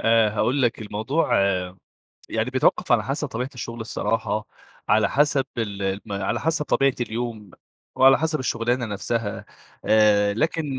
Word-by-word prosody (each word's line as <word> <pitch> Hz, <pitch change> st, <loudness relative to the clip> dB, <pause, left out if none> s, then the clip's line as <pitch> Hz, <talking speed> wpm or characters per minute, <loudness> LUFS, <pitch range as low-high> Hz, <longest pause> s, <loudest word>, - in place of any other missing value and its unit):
آآ، 115 Hz, -1 st, +4 dB
هاقول 130 Hz, +6 st, 0 dB
لك 120 Hz, -2 st, +1 dB
الموضوع 110 Hz, +9 st, -1 dB, 1.0 s
يعني 110 Hz, +3 st, -1 dB
بيتوقف 130 Hz, -1 st, +2 dB
على 115 Hz, -3 st, +3 dB
حسب 140 Hz, +4 st, -2 dB
طبيعة 125 Hz, +2 st, -4 dB
الشغل 120 Hz, -1 st, -6 dB
الصراحة، 110 Hz, -1 st, -2 dB, 0.4 s
على 110 Hz, 0 st, +4 dB
حسب 145 Hz, -1 st, +2 dB
ال 100 Hz, -3 st, -3 dB
الم 95 Hz, +2 st, -3 dB
على -, -, -1 dB
حسب 160 Hz, -1 st, 0 dB
طبيعة 135 Hz, -2 st, +2 dB
اليوم 115 Hz, -3 st, -4 dB, 0.5 s
وعلى 135 Hz, 0 st, +6 dB
حسب 160 Hz, 0 st, 0 dB
الشغلانة 120 Hz, 0 st, -1 dB
نفسها. 105 Hz, +1 st, -3 dB, 0.4 s
آآ، 105 Hz, -1 st, +4 dB
لكن 160 Hz, +7 st, 0 dB
115 Hz, 140 wpm, -23 LUFS, 110-135 Hz, 1.0 s, وعلى